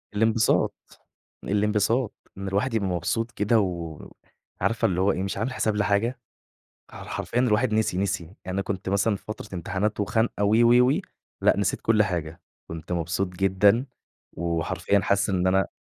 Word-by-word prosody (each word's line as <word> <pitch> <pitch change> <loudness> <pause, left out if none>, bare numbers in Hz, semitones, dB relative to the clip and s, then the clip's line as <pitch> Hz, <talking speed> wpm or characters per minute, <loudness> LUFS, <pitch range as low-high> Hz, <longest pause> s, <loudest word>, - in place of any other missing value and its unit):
الإنبساط، 110 +1 +1 0.4
الإنبساط، 105 +3 +1 0.2
إن 100 0 -5
الواحد 100 +6 0
يبقى 105 -4 0
مبسوط 105 +6 -1
كده 105 +2 +2
و 85 -6 -3 0.6
عارفة 115 -1 +1
اللي 90 -1 +1
هو 100 - +3
إيه، 95 - -2
مش 100 - -3
عامل 115 +6 -2
حساب 110 -4 0
لحاجة، 105 +4 +1 0.7
ح - - -9
حرفيًا 120 - -3
الواحد 120 -1 +2
نسي، 110 -4 +1
نسي 95 -2 -1
يعني 85 +5 -16
أنا 95 +1 -1
كنت 95 -1 -4
مثلًا 100 +2 +2
في - - -11
فترة 110 -3 -7
امتحانات 95 +5 -2
وخنقة 105 +1 0
و 105 +2 +3
و 120 +2 +5
و 150 +7 +2 0.4
لأ - - +4
نسيت 100 -2 0
كل 110 -1 +3
حاجة، 85 -3 -4 0.3
كنت 80 +1 -8
مبسوط 90 +3 -1
جدًا، 95 +6 +2 0.5
وحرفيًا 85 +3 0
حاسس 100 +2 +1
إن 95 -1 +1
أنا 95 +1 +2
100 Hz, 165 wpm, -25 LUFS, 95-110 Hz, 0.7 s, و